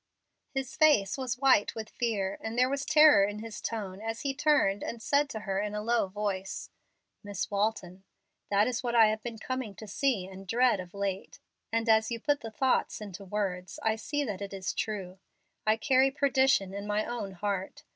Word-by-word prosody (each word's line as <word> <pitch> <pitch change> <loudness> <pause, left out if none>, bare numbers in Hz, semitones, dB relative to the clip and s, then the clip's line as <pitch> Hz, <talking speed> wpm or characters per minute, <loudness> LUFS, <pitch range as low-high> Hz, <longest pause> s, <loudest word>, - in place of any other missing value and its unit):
His 270 -1 -3
face 290 -11 +4
was 255 -2 -3
white 260 -6 +3
with 220 -1 -5
fear, 200 -5 -1
and 225 +1 -5
there 255 +1 +3
was 280 0 -2
terror 300 -7 +7
in 205 +1 -1
his 220 0 -7
tone 200 -4 -4
as 225 +1 -4
he 275 -1 -1
turned 285 -9 +2
and 235 - -5
said 285 +5 +1
to 220 - -5
her, 195 -2 -2
in 210 0 -2
a 210 - -3
low 235 -2 +2
voice, 195 -1 -4 0.5
"Miss 200 -1 -4
Walton, 200 -3 -1 0.5
that 205 +1 +4
is 250 -2 -1
what 240 -2 -2
I 225 -2 +7
have 215 0 -2
been 235 0 -6
coming 255 -3 -4
to 215 - -9
see 220 -2 0
and 190 +1 -11
dread, 240 0 +3
of 180 +1 -9
late, 195 -1 -4 0.3
and 230 +1 0
as 220 0 +4
you 235 -1 -3
put 290 +4 +1
the 225 - -6
thoughts 260 +4 0
into 200 -3 -8
words 185 -2 -3
I 220 0 +2
see 290 +6 -2
that 205 -7 -4
it 200 0 -5
is 190 -2 -3
true. 190 -4 -4 0.5
I 215 +1 +4
carry 265 +2 +4
perdition 265 -8 +2
in 200 +1 -5
my 210 +1 0
own 230 -5 -4
heart. 195 0 -3
215 Hz, 200 wpm, -29 LUFS, 195-250 Hz, 0.5 s, terror